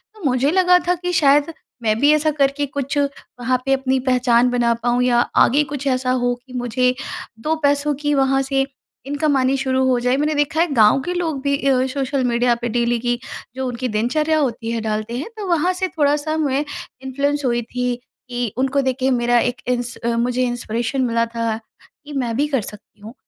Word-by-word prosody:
तो 415 - -14
मुझे 265 +3 +2
लगा 360 -1 +5
था 360 - +3
कि 355 +1 -4
शायद 290 +1 +3 0.3
मैं 215 0 +2
भी 290 +1 +5
ऐसा 305 0 +2
करके 285 0 +1
कुछ 275 +1 -4
वहाँ 255 -3 -2
पे 270 - +2
अपनी 265 -1 +1
पहचान 245 -1 +3
बना 240 -1 +2
पाऊँ 245 0 +2
या 240 -1 +3 0.2
आगे 290 +4 +3
कुछ 280 0 -4
ऐसा 255 -1 +1
हो 245 -1 +1
कि 255 - -14
मुझे 250 +1 +1 0.5
2 315 +4 0
पैसों 285 +1 +2
की 295 0 +1
वहाँ 270 0 +2
से 270 0 0 0.4
इनकम 290 0 +1
आनी 260 +1 +2
शुरू 260 -1 0
हो 250 -2 +2
जाए। 250 +2 +1
मैंने 300 +1 0
देखा 295 +2 0
है 350 - +3
गाँव 220 +2 +5
के 360 - -2
लोग 325 -6 -2
भी 280 0 +2
अ, 260 -1 +3
सोशल 275 -1 -1
मीडिया 240 0 +2
पे 240 - -2
डेली 240 0 +1
की 240 0 -1 0.4
जो 260 -1 -2
उनकी 250 +1 -3
दिनचर्या 255 +9 +1
होती 230 -4 -2
है 230 -1 -2
डालते 215 +2 -3
हैं, 295 - -5
तो 405 -3 -5
वहाँ 350 +1 +2
से 370 +1 -1
थोड़ा-सा 300 -1 0
मैं 285 -2 0 0.4
इन्फ्लुएंस 285 +2 -1
हुई 240 -1 +1
थी 250 +1 -2 0.3
कि 245 -3 -3
उनको 270 +1 +1
देख 260 -1 0
के 260 - -1
ही 265 - +3
मेरा 240 -1 +3
एक 245 +1 -1
इंस 245 -1 -1
अ, 235 0 -1
मुझे 250 +2 +1
इंस्पिरेशन 240 +2 -2
मिला 230 -1 +1
था, 230 -1 -2 0.5
कि 295 - -9
मैं 240 -4 -1
भी 295 +1 +2
कर 270 -6 0
सकती 210 +1 -11
हूँ, 220 +3 -10
260 Hz, 210 wpm, -20 LUFS, 240-290 Hz, 0.5 s, लगा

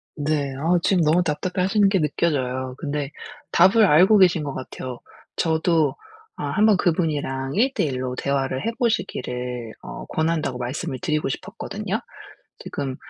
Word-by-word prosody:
네. 145 -2 -1
아 165 +5 +2
지금 185 -4 +3
너무 160 +4 +3
답답해 180 +4 -1
하시는 200 +1 +3
게 195 -2 +2
느껴져요. 130 -5 -1
근데 145 -2 -3 0.4
답을 195 +5 +6
알고 185 +6 +6
계신 175 -5 +4
것 140 - -4
같아요. 130 -1 -7 0.4
저도 160 -1 +2 0.4
아 - - -5
'1 210 - +3
번 215 -2 +6
그분이랑 150 -7 -1
1:1 180 - +1
로 125 0 -3
대화를 135 +2 -1
해 230 - +1
보시기를 125 - -2
어 - - -8
권한다.'고 160 -5 -1
말씀을 130 +3 -4
드리고 155 -5 0
싶었거든요. - - -4 0.6
지금 135 -2 -4
150 Hz, 295 characters per minute, -23 LUFS, 135-180 Hz, 0.6 s, 답을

